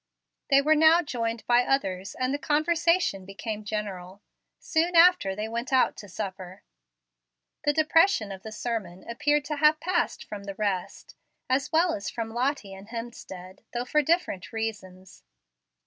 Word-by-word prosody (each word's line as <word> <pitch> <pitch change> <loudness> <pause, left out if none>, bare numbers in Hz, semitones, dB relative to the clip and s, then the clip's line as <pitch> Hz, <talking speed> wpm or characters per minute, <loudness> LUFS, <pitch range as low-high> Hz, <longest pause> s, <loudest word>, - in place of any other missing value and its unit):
They 275 0 +5
were 310 +2 +4
now 320 +3 +5
joined 230 -5 -3
by 240 0 +4
others, 195 -8 -1
and 255 +1 -1
the 285 - -2
conversation 315 - +1
became 210 +3 -6
general. 200 -2 -5 0.3
Soon 340 +2 0
after 335 - +5
they 210 +2 -3
went 235 +3 -4
out 260 -1 +3
to 205 - -10
supper. 190 -1 -7 1.0
The 290 - +3
depression 315 - +3
of 190 -1 -8
the 220 - -8
sermon 210 -6 -5
appeared 290 +5 +1
to 300 0 -3
have 305 +1 +4
passed 350 +2 -1
from 205 -1 -8
the 200 -1 -6
rest, 200 -4 -3 0.3
as 265 +2 0
well 330 +1 +3
as 200 - -4
from 225 -1 -5
Lottie 245 -5 -1
and 195 +1 -11
Hemstead, 220 -6 -8
though 240 0 -2
for 300 +4 +2
different 290 - -1
reasons. 195 -5 -6
230 Hz, 155 wpm, -27 LUFS, 195-295 Hz, 1.0 s, They